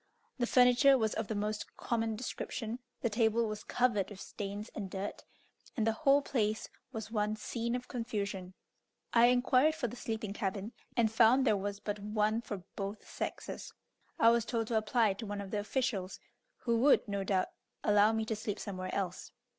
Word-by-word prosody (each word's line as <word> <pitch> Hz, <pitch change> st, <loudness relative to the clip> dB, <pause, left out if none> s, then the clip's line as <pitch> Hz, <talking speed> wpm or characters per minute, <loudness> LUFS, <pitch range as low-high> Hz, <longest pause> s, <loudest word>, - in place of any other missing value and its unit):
The 240 Hz, -, +1 dB
furniture 250 Hz, +3 st, +6 dB
was 220 Hz, -3 st, +1 dB
of 220 Hz, -1 st, -2 dB
the 220 Hz, -, -2 dB
most 210 Hz, +1 st, -3 dB
common 225 Hz, -2 st, -1 dB
description, 235 Hz, 0 st, -4 dB, 0.2 s
the 235 Hz, -, +1 dB
table 225 Hz, +1 st, +2 dB
was 215 Hz, -1 st, -5 dB
covered 235 Hz, -6 st, +1 dB
with 205 Hz, -2 st, -10 dB
stains 205 Hz, +2 st, -6 dB
and 200 Hz, -3 st, -5 dB
dirt, 195 Hz, +2 st, -5 dB, 0.5 s
and 220 Hz, -, +2 dB
the 225 Hz, -, +4 dB
whole 275 Hz, +4 st, +3 dB
place 215 Hz, -6 st, 0 dB, 0.2 s
was 220 Hz, -3 st, -6 dB
one 210 Hz, -1 st, 0 dB
scene 235 Hz, +2 st, -2 dB
of 250 Hz, 0 st, -5 dB
confusion. 200 Hz, -6 st, -4 dB, 0.6 s
I 235 Hz, 0 st, +7 dB
inquired 255 Hz, +5 st, +4 dB
for 255 Hz, -, -1 dB
the 235 Hz, -, -7 dB
sleeping 220 Hz, -4 st, -4 dB
cabin, 200 Hz, +2 st, -3 dB, 0.3 s
and 225 Hz, -2 st, +3 dB
found 235 Hz, +4 st, +5 dB
there 215 Hz, -, +4 dB
was 200 Hz, +1 st, -3 dB
but 205 Hz, 0 st, -3 dB
one 210 Hz, +2 st, 0 dB
for 205 Hz, -5 st, -6 dB
both 200 Hz, +1 st, -5 dB
sexes. -, -, -5 dB, 0.4 s
I 230 Hz, -, +6 dB
was 235 Hz, -1 st, +3 dB
told 230 Hz, -1 st, -1 dB
to 235 Hz, -, 0 dB
apply 220 Hz, -1 st, +3 dB
to 210 Hz, +3 st, -7 dB
one 205 Hz, 0 st, -4 dB
of 200 Hz, -1 st, -6 dB
the 210 Hz, -, 0 dB
officials, 210 Hz, -4 st, -2 dB, 0.4 s
who 235 Hz, -1 st, 0 dB
would 270 Hz, -1 st, +5 dB
no 200 Hz, -1 st, -1 dB
doubt 190 Hz, -1 st, +1 dB, 0.3 s
allow 210 Hz, +1 st, +5 dB
me 220 Hz, 0 st, 0 dB
to 220 Hz, -, -1 dB
sleep 210 Hz, -1 st, -3 dB
somewhere 185 Hz, -3 st, -5 dB
else. 185 Hz, -2 st, -3 dB
220 Hz, 185 wpm, -33 LUFS, 205-235 Hz, 0.6 s, I